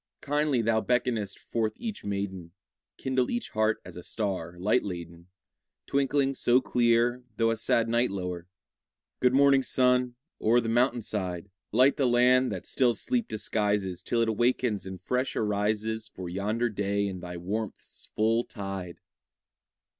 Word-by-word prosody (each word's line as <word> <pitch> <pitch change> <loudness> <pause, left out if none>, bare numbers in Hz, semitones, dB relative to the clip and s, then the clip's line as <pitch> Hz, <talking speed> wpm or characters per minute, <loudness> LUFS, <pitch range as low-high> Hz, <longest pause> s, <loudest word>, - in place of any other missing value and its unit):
Kindly 145 -4 +1
thou 110 0 +2
beckonest 120 -5 0
forth 110 -2 -2
each 220 -3 -5
maiden; 95 -4 -4 0.4
Kindle 130 -1 0
each 240 0 -3
heart 110 0 +1
as 90 - -10
a 90 - -7
star 90 -4 -3
light 105 +7 +2
laden, 85 -3 -7 0.6
Twinkling 140 0 +1
so 125 -1 +3
clear, 120 0 +2
though 115 0 +3
a - - 0
sad 115 +1 +1
night 120 +2 +2
lower! 90 -3 -4 0.7
Good 125 0 +3
morning, 140 -1 +5
sun, 125 -1 +2 0.3
o'er 115 +3 +4
the 115 - -3
mountain 120 0 +2
side! 95 -3 -4 0.2
Light 130 +5 +4
the 135 - +2
land 125 +1 +4
that - - -5
still 125 -3 +2
sleep 245 -3 -1
disguises 105 -3 -1
Till 120 -1 0
it 115 - +2
awakens 120 -2 0
and 95 -1 -7
fresh 125 +7 -1
arises 110 +1 -1
For 90 -1 -8
yonder 105 +6 -1
day 100 -1 -1
in 95 -2 -4
thy 90 0 -7
warmth's 100 +5 -5
full 115 +2 +2
tide! 95 -5 -6
110 Hz, 150 wpm, -28 LUFS, 100-125 Hz, 0.7 s, morning